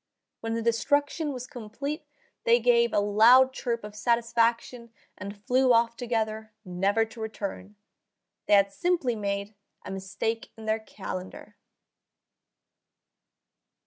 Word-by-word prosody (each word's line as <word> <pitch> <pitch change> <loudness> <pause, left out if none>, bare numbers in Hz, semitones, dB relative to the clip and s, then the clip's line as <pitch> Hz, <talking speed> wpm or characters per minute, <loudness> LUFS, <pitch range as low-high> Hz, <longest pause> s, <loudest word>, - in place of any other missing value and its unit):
When 225 0 -3
the 230 - -2
destruction 285 +6 +1
was 250 -2 -6
complete 265 +4 -6 0.4
they 475 0 +5
gave 475 -1 +3
a - - +2
loud 230 +6 +6
chirp 235 -3 -3
of 210 0 -9
satisfaction 235 +1 0 0.2
and 200 +1 -8
flew 255 0 +4
off 230 0 +3
together, 220 -3 -3
never 195 +5 +1
to 225 +1 -12
return. 210 -2 -6 0.7
They - - +3
had 200 0 +3
simply 335 - 0
made 200 0 -3 0.3
a - - -6
mistake 195 +4 -4
in 220 - -10
their 220 0 0
calendar. 195 -1 -8
225 Hz, 120 wpm, -27 LUFS, 210-250 Hz, 0.7 s, loud